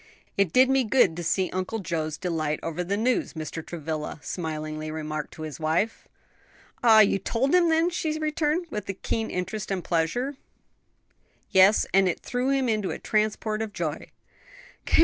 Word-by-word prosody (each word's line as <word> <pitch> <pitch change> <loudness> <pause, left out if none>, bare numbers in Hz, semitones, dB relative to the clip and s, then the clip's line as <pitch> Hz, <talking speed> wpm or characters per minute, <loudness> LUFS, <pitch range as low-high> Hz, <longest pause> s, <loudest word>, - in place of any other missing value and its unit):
"It 200 -4 +2
did 255 +6 +6
me 265 0 +3
good 220 -7 +3
to 175 - -4
see 185 +2 0
Uncle 185 +4 -2
Joe's 160 -5 -3
delight 155 -4 -1
over 165 +2 -2
the 195 +3 -1
news," 245 +3 0
Mr. 160 0 -5
Travilla 160 -2 -5
smilingly 155 -2 -4
remarked 155 -1 -4
to 155 - -7
his 155 -4 -6
wife. 160 +8 0 0.8
"Ah, 220 -2 +8
you 200 -1 +3
told 245 - 0
him 355 -2 +5
then?" 325 +2 +3
she 315 -3 -1
returned, 310 +2 0
with 210 -2 -5
a - - 0
keen 225 +3 -2
interest 190 +3 -4
and 190 -3 -2
pleasure. 240 - -1 1.1
"Yes, 190 +3 +6
and 195 -1 +5
it - - -3
threw 250 +2 -1
him 270 -2 +2
into 215 -4 0
a - - -3
transport 215 0 0
of 220 -2 -4
joy. 160 -4 -3
195 Hz, 170 wpm, -26 LUFS, 160-245 Hz, 1.1 s, Ah